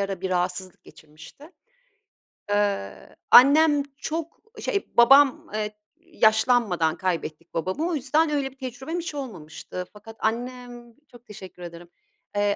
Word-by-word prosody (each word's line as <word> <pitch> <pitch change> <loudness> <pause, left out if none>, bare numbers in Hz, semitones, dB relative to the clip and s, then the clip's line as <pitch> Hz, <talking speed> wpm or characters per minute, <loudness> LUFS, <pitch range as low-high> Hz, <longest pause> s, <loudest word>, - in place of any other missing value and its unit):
ara 195 -2 -3
bir 190 -1 -3
rahatsızlık 180 0 -3
geçirmişti. 155 - -16 1.0
Eee, 205 - -2 0.2
annem 290 +3 +7
çok 325 +1 -5 0.2
e - - -9
şey 400 - -2
babam 275 +3 +6
eee, 210 0 -3 0.2
yaşlanmadan 220 - +2
kaybettik 165 -2 -4
babamı 185 - -2
o 345 - -1
yüzden 310 +3 +1
öyle 280 -3 -1
bir 270 - -24
tecrübem 265 +6 -5
hiç 330 -3 -6
olmamıştı. 180 - -7
Fakat 220 +2 -13
annem 240 +1 -4 0.2
çok 240 -1 -17
teşekkür 195 -5 -12
ederim, 170 0 -10 0.5
eee, 205 0 +1
225 Hz, 130 wpm, -24 LUFS, 185-275 Hz, 1.0 s, annem